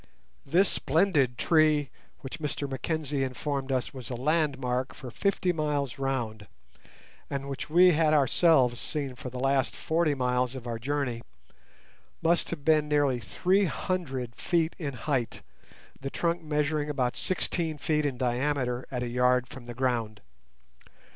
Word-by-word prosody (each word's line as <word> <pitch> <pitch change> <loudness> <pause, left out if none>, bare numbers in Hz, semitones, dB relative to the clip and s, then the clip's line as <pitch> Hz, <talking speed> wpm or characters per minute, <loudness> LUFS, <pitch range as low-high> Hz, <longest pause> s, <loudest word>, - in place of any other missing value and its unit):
This 180 +7 +4
splendid 145 -8 +2
tree, 155 -4 +3 0.3
which 135 - -7
Mr 150 -2 -3
Mackenzie 140 +1 -2
informed 135 +1 -3
us 130 -2 -1
was 130 -3 -7
a 125 - -3
landmark 130 -2 0
for 130 -5 -8
fifty 185 - 0
miles 145 -5 -1
round, 120 -6 -2 0.8
and 140 -1 -3
which 140 +1 -5
we 180 +3 +7
had 155 -1 +3
ourselves 135 -3 +4
seen 140 -4 -3
for 125 0 -7
the 125 - -8
last 135 0 +1
forty 160 -2 +1
miles 125 0 0
of 125 -2 -7
our 115 -2 -3
journey, 130 -2 -2 1.0
must 170 +1 +2
have 150 -4 -6
been 155 -1 +4
nearly 145 -4 +2
three 185 - +1
hundred 135 -10 -3
feet 170 -2 0
in 145 -5 -3
height, 130 -2 -2 0.6
the 135 - -4
trunk 170 +3 -1
measuring 150 -1 0
about 125 -4 0
sixteen 170 -4 -1
feet 150 +1 0
in 140 -4 -1
diameter 125 0 -1
at 125 -2 -3
a - - -2
yard 125 +1 +2
from 125 -2 -11
the 120 - -7
ground. 115 -4 -1
140 Hz, 145 wpm, -28 LUFS, 125-155 Hz, 1.0 s, we